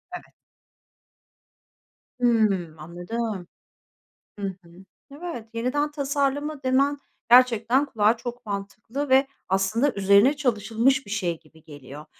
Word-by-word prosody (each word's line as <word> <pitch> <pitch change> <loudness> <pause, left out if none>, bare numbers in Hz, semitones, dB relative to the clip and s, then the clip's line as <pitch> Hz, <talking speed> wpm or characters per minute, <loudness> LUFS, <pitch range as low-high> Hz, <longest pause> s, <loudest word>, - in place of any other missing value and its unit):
Evet. - - -11 1.9
Hımm, 210 -9 +2
anladım. 175 +4 -5 0.9
Hı 200 - -3
hı, 185 -2 -10 0.4
evet, 290 -6 -7
yeniden 260 +6 -1
tasarlama 285 0 -2
demen 275 +2 +2 0.3
gerçekten 245 +1 +5
kulağa 225 -4 +2
çok 240 0 -7
mantıklı 215 +7 -5
ve 265 +1 +5 0.2
aslında 215 +9 +1
üzerine 200 +7 +4
çalışılmış 250 0 +1
bir 200 - -10
şey 175 -6 -2
gibi 160 -1 -22
geliyor. 145 0 -11
230 Hz, 105 wpm, -24 LUFS, 195-270 Hz, 1.9 s, gerçekten